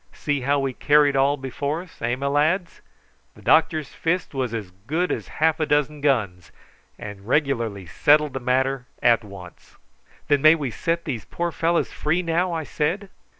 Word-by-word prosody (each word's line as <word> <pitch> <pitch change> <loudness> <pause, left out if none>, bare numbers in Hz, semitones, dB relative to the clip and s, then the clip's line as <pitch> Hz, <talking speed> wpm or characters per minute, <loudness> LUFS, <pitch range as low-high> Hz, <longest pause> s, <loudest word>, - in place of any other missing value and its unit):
See 145 -2 -2
how 140 +3 +1
we 135 -2 -1
carried 145 +1 +3
all 140 +2 +3
before 140 +5 -3
us, 185 - -19
eh, 120 +1 0
my 135 +2 -5
lads! 155 +6 0 0.5
The - - -16
doctor's 160 -3 +3
fist 170 0 -2
was 130 -4 -2
as 110 -5 -5 0.2
good 170 +5 0
as - - -3
half 160 +1 +2
a 155 - +1
dozen 150 0 0
guns, 105 - 0 0.5
and 105 -1 -9
regularly 115 -8 0
settled 150 - +3
the 130 - -3
matter 130 +1 0 0.2
at 120 -1 +4
once." 95 -4 -13 0.5
"Then 145 -2 +3
we 155 +2 +7
may 145 -5 -3
set 170 +5 -2
these 125 -9 -4
poor 175 0 -3
fellows 165 +1 0
free 160 +4 -1
now?" 170 +2 0
I 165 -1 -2
said. 170 +7 -2
145 Hz, 175 wpm, -23 LUFS, 125-160 Hz, 0.5 s, we